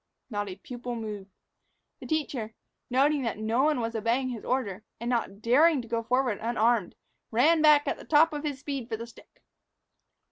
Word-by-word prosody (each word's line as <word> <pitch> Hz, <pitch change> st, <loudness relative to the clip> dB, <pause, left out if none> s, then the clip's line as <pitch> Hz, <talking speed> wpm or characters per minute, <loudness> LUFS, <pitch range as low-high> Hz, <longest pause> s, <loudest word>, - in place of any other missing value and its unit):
Not 205 Hz, -1 st, -2 dB
a 185 Hz, -, -6 dB
pupil 245 Hz, +4 st, -7 dB
moved. 210 Hz, -3 st, -6 dB, 0.7 s
The -, -, -9 dB
teacher, 260 Hz, -8 st, -2 dB, 0.3 s
noting 280 Hz, +3 st, +3 dB
that 230 Hz, -5 st, -2 dB
no 220 Hz, +4 st, 0 dB
one 300 Hz, -2 st, +2 dB
was 230 Hz, -1 st, -2 dB
obeying 235 Hz, +4 st, 0 dB
his 235 Hz, -4 st, -6 dB
order, 220 Hz, -6 st, -2 dB, 0.2 s
and 235 Hz, +2 st, -3 dB
not 220 Hz, -4 st, -2 dB
daring 295 Hz, +6 st, +5 dB
to -, -, -12 dB
go 230 Hz, 0 st, -1 dB
forward 245 Hz, -1 st, 0 dB
unarmed, 230 Hz, -3 st, +1 dB, 0.3 s
ran 305 Hz, +8 st, +4 dB
back 300 Hz, -1 st, +6 dB
at -, -, -1 dB
the -, -, -10 dB
top 315 Hz, +1 st, +4 dB
of 295 Hz, 0 st, -4 dB
his 290 Hz, -3 st, -2 dB
speed 270 Hz, -3 st, -5 dB
for 220 Hz, -, -2 dB
the 230 Hz, -, -6 dB
stick. 235 Hz, -, -18 dB
240 Hz, 185 wpm, -28 LUFS, 225-280 Hz, 0.7 s, back